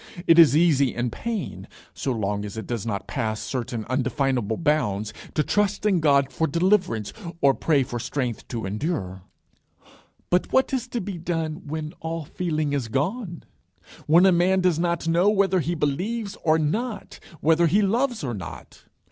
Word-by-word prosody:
It 165 0 +6
is 150 -3 +7
easy 145 -6 +3
in 120 0 -1
pain, 230 - -5 0.3
so 135 - -2
long 105 -3 -2
as 105 +1 -7
it 110 - -5
does 115 -2 -4
not 100 -3 -3
pass 110 -5 -2
certain 120 -3 -4
undefinable 130 -3 0
bounds, 115 -10 0 0.2
to 150 - +1
hope 205 0 +1
in 195 -4 +3
God 140 -3 +3
for 160 - 0
deliverance, 170 - +1 0.3
or 140 -3 +4
pray 145 -2 +2
for 120 -2 -5
strength 125 -3 -3
to 115 -4 -4
endure. 95 - -3 1.1
But 180 +1 +1
what 265 +1 +2
is 255 -1 -1
to 240 -1 -3
be 185 -2 -5
done 165 -1 -3
when 155 +1 -4
all 165 -1 -4
feeling 155 -3 -2
is 135 -5 -1
gone? 170 - -2 0.6
when 170 +4 +6
a 190 - +6
man 185 +2 +3
does 180 -3 +2
not 170 -1 -1
know 170 +4 +4
whether 195 -3 +2
he 170 +2 -1
believes 195 +9 -2
or 155 -1 +4
not, 210 +8 -3 0.2
whether 165 +2 +3
he 200 +6 +3
loves 235 - 0
or 125 -4 -2
not? 90 -7 -9
155 Hz, 170 wpm, -24 LUFS, 125-180 Hz, 1.1 s, is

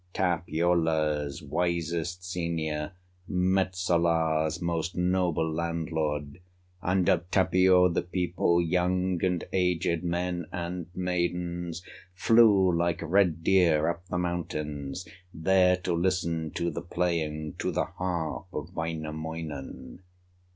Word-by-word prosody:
Tapiola's 80 -3 0
wisest 85 +2 -2
senior, 80 -3 -2 0.4
Metsola's 85 -4 +1
most 85 0 -2
noble 90 -2 +1
landlord, 80 -2 -2 0.4
And 90 0 +1
of 85 0 +2
Tapio, 95 -1 +5
the 85 - 0
people, 90 -1 +1
Young 90 +1 +1
and 90 -2 +1
aged, 90 -2 +1
men 85 -1 -2
and 85 0 -4
maidens, 90 -1 -2 0.3
Flew 100 -4 +5
like 85 0 0
red 85 -1 +2
deer 85 -5 +4
up 85 0 -4
the 90 - -2
mountains 75 -3 -3 0.3
There 90 +2 +4
to 90 -1 -2
listen 85 -2 0
to 85 -1 -1
the 85 - -4
playing, 80 -4 -2
To - - -1
the - - 0
harp 90 -4 -3
of - - -6
Wainamoinen. 80 -1 -5
85 Hz, 105 wpm, -28 LUFS, 80-90 Hz, 0.4 s, Tapio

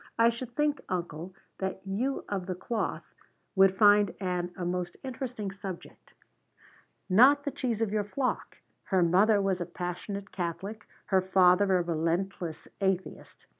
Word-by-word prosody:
I 230 0 +6
should 240 +1 -8
think, 295 -1 +1
uncle, 175 0 -4 0.2
that 190 0 -3
you 235 +8 -2
of 190 -3 -3
the 185 - -2
cloth 225 +5 -3 0.4
would 190 0 +5
find 205 -2 +5
Ann 180 -2 -2
a 180 - -3
most 175 0 -3
interesting 245 -5 -4
subject. 195 -2 -9 0.9
Not 260 +9 +6
that 285 -1 -5
she's 230 -4 0
of 215 - -1
your 210 -1 +1
flock. 255 +5 -2 0.3
Her 190 -3 +2
mother 200 +5 +4
was 195 -2 0
a - - -1
passionate 195 +3 -5
Catholic. 190 +5 -5 0.2
Her 190 -1 +3
father 185 +1 +4
a 175 - +1
relentless 170 +1 -2
atheist. 190 -1 -2
195 Hz, 145 wpm, -29 LUFS, 180-215 Hz, 0.9 s, I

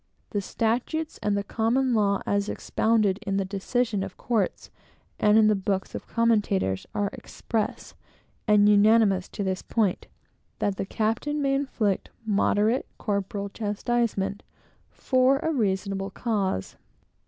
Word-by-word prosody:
The 205 - -1
statutes, 245 +10 -2
and 205 -1 +1
the 200 - -1
common 240 +5 +1
law 200 -3 +2
as 200 0 0
expounded 215 -3 +1
in 195 -2 -2
the 195 - 0
decisions 205 +2 -1
of 195 -1 -8
courts, 220 -6 -1 0.5
and 210 +1 +5
in 220 - +6
the 215 - +5
books 195 -1 -2
of - - -7
commentators, 205 - +1
are 205 -1 0
express 220 -2 -4 0.5
and 210 -1 +5
unanimous 210 -2 +4
to 205 - -4
this 190 -1 -2
point, 210 -6 -1 0.5
that 200 -2 -1
the - - -3
captain 225 +9 -1
may 275 -1 +1
inflict 250 -8 -1 0.2
moderate 215 +3 +2
corporal 200 -1 -2
chastisement, 205 -1 -1 0.5
for 260 +1 +2
a 320 +2 -1
reasonable 195 -4 -1
cause. 200 - -2
210 Hz, 130 wpm, -26 LUFS, 195-230 Hz, 0.5 s, in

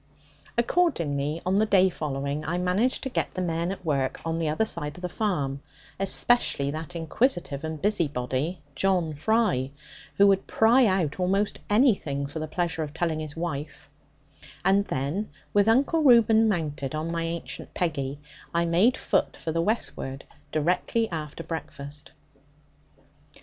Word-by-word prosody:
Accordingly, 165 - +1
on 190 +2 +2
the 215 - +4
day 190 -2 +5
following, 140 -1 -3
I 165 +4 -2
managed 185 +8 +1
to 265 - -3
set - - -1
the 185 - -2
men 170 +1 -1
at 190 -2 -7
work 135 -4 0
on 165 0 -1
the 160 -2 0
other 155 +9 +1
side 150 -7 -3
of 180 - -12
the - - 0
farm, 150 -9 -2 0.4
especially 195 -7 +2
that 160 +3 -6
inquisitive 165 - 0
and 160 -1 -4
busybody 150 -4 -1
John 175 0 +1
Fry, 150 - +1 0.5
who 200 - +6
would 195 -1 +3
pry 235 +3 +5
out 185 -5 0
almost 195 +3 0
anything 205 - +2
for 145 +3 -5
the 155 - -3
pleasure 165 0 -2
of 150 0 -5
telling 165 -2 -1
his 155 -2 -6
wife; 160 -3 -5 0.7
and 195 +1 +4
then, 145 +10 -2 0.2
with 205 0 +4
Uncle 275 +8 +3
Reuben 225 -5 +6
mounted 150 -6 -2
on 155 +2 -2
my 170 0 -1
ancient 165 0 -5
Peggy, 145 -5 -2 0.4
I 170 0 +3
made 190 +10 +3
foot 190 - 0
for 160 - -4
the 165 +1 0
westward, 155 - -1 0.3
directly 180 +8 0
after 155 0 -5
breakfast. 150 -3 -7
170 Hz, 150 wpm, -26 LUFS, 150-200 Hz, 0.7 s, who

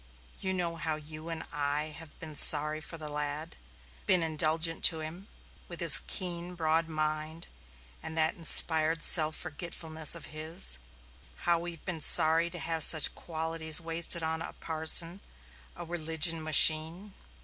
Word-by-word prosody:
You 190 - -6
know 170 -2 -6
how 160 -1 -6
you 155 +1 -13
and 165 -1 -8
I 150 +1 -6
have 165 -3 -16
been 155 -1 -10
sorry 150 +1 +6
for 165 - -12
the 155 -1 -10
lad 150 +2 -9 0.5
been 180 -3 +1
indulgent 160 +1 -2
to 160 -2 +3
him 170 +6 -12 0.4
with - - -13
his - - +7
keen, 180 -1 -6
broad 160 0 -3
mind 155 +1 -7 0.6
and 160 0 -8
that 160 0 0
inspired 160 -1 +4
self 155 -2 +3
forgetfulness 160 0 -7
of 165 -4 -9
his 155 - -3 0.7
how 170 -1 -1
we've 170 -1 -11
been 175 -4 -6
sorry 160 +3 +2
to 175 - -10
have 165 -1 -2
such 155 -3 +5
qualities 160 -1 +1
wasted 165 0 -3
on 160 0 -6
a - - -10
parson, 165 +3 +2 0.6
a 175 - -11
religion 165 -1 -4
machine. 160 +5 +2
160 Hz, 150 wpm, -26 LUFS, 155-170 Hz, 0.7 s, his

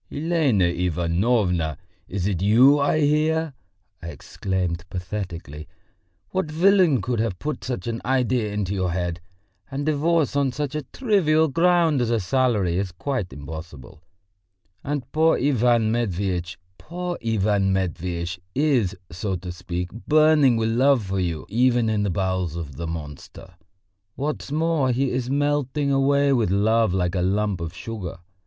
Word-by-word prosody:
"Elena 150 - +1
Ivanovna! 85 - 0 0.3
is 95 -1 -3
it 95 -4 -1
you 125 +8 +5
I 145 +2 +2
hear!" 155 +1 +1 0.5
I 85 - -7
exclaimed 90 0 -3
pathetically. 90 -5 -6 0.6
"What 185 -4 -1
villain 170 - +3
could 120 -2 -1
have 110 -5 -1
put 150 +7 -4
such 125 -1 -4
an 115 -1 -3
idea 125 -4 0
into 100 -2 -2
your 95 -2 -1
head? 90 -1 -3 0.5
And 140 +1 -4
divorce 155 0 +1
on 140 -3 +1
such 145 0 -3
a 150 - -2
trivial 160 - +2
ground 165 -2 +3
as 120 - 0
a 115 -1 +1
salary 105 -5 +1
is 100 -2 -3
quite 105 +1 -3
impossible. 75 0 -9 0.8
And 145 -3 -3
poor 160 +1 +3
Ivan 120 -4 +2
Matveitch, 95 -6 -2 0.2
poor 175 +1 -5
Ivan 105 -3 +1
Matveitch 90 -1 -2 0.2
is, 130 -9 +2 0.2
so 95 +3 -3
to 90 0 -6
speak, 90 0 -5 0.2
burning 155 -5 +5
with 110 0 0
love 130 +1 +3
for 95 0 -2
you 85 -4 -2
even 120 +1 +2
in 105 -1 0
the 100 - 0
bowels 95 -2 -1
of 80 -5 -6
the 85 0 -5
monster. 80 +3 -8 0.6
What's 145 0 -4
more, 155 -3 +1
he 130 +2 0
is 125 0 -2
melting 145 0 0
away 140 +1 +3
with 115 -7 +1
love 110 +2 +2
like 90 -1 0
a 90 - 0
lump 100 0 0
of 85 -1 -4
sugar. 100 -3 -6
110 Hz, 150 wpm, -23 LUFS, 90-140 Hz, 0.8 s, you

